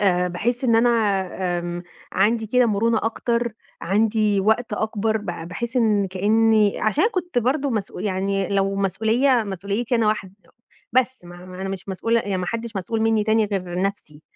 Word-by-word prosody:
آآ 180 -3 +2
باحس 240 +8 -2
إن 230 -2 +4
أنا 235 +2 +4 0.7
آمم 175 0 -5 0.3
عندي 220 +4 +2
كده 250 +3 +3
مرونة 225 +1 +2
أكتر، 235 +1 -1 0.3
عندي 210 +1 +2
وقت 220 +3 +1
أكبر 220 0 -1
ب 210 - -10
باحس 180 +8 -5
إن 210 -5 +3
كأني 210 +2 +2
عشان 215 - +2
كنت 355 -6 -1
برضه 270 +4 0
مسؤو 215 -5 -3
يعني 195 -1 -1
لو 195 0 +1
مسؤولية 220 +6 +2
مسؤوليتي 200 +5 -2
أنا 230 -2 +2
واحد 195 -3 -2 0.6
بس، 255 -3 +1
ما 175 +1 -11
ما 185 0 -9
أنا 195 - -3
مش 195 0 -6
مسؤولة 230 +5 +1
يعني 200 -3 -2
ما 180 - -3
حدش 230 +1 -4
مسؤول 210 +4 -2
منّي 220 -1 +2
تاني 220 0 +3
غير 185 -3 -3
نفسي، 175 -7 -4
215 Hz, 165 wpm, -22 LUFS, 195-230 Hz, 0.7 s, إن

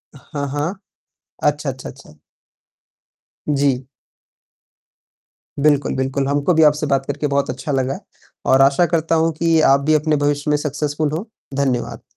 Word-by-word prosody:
हाँ, 140 +1 -6
हाँ। 145 +6 -2 0.7
अच्छा, 150 -1 +1
अच्छा, 130 -1 -6
अच्छा। 100 - -15 1.3
जी। 140 -3 +1 1.7
बिल्कुल, 145 -1 +2
बिल्कुल। 135 +1 -1
हमको 145 +5 +1
भी 160 - +4
आपसे 150 0 +3
बात 135 -1 +1
करके 145 +2 -2
बहुत 140 0 0
अच्छा 140 +3 -4
लगा 135 0 -1 0.5
और 130 - +6
आशा 140 +5 +4
करता 165 0 +2
हूँ 165 +1 +2
कि 165 -1 +3
आप 140 - +4
भी 155 - +5
अपने 155 0 +2
भविष्य 145 +1 0
में 150 - +3
सक्सेसफुल 150 +1 -2
हों। 185 - -4 0.4
धन्यवाद। 125 -3 -2
145 Hz, 145 wpm, -19 LUFS, 135-150 Hz, 1.7 s, और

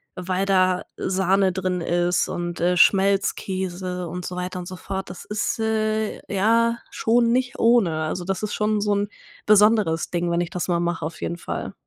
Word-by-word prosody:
weil 185 +1 -2
da 185 -2 +2
Sahne 190 0 +1
drin 185 -1 -1
ist 175 +1 +1
und, 175 0 -4
äh, 180 +1 +2
Schmelzkäse 185 -1 +1
und 180 +1 -6
so 180 - -5
weiter 180 0 -4
und 175 - -7
so 185 - -7
fort. 190 +1 -5
Das 180 - -9
ist, 210 +2 -2
äh, 220 -1 0
ja 230 +4 +3
schon 235 +1 +2
nicht 250 0 0
ohne. 200 -10 +3
Also, 175 +3 -3
das 195 +2 -3
ist 210 - -2
schon 210 -1 0
so 205 0 +1
'n 205 0 0 0.4
besonderes 210 -5 +4
Ding, 175 0 -1
wenn 170 +1 +1
ich 175 - -3
das 180 0 -3
mal 170 -1 +1
mache 170 -2 -2
auf 165 - -7
jeden 170 - -3
Fall. - - -5
185 Hz, 185 wpm, -23 LUFS, 175-210 Hz, 0.4 s, besonderes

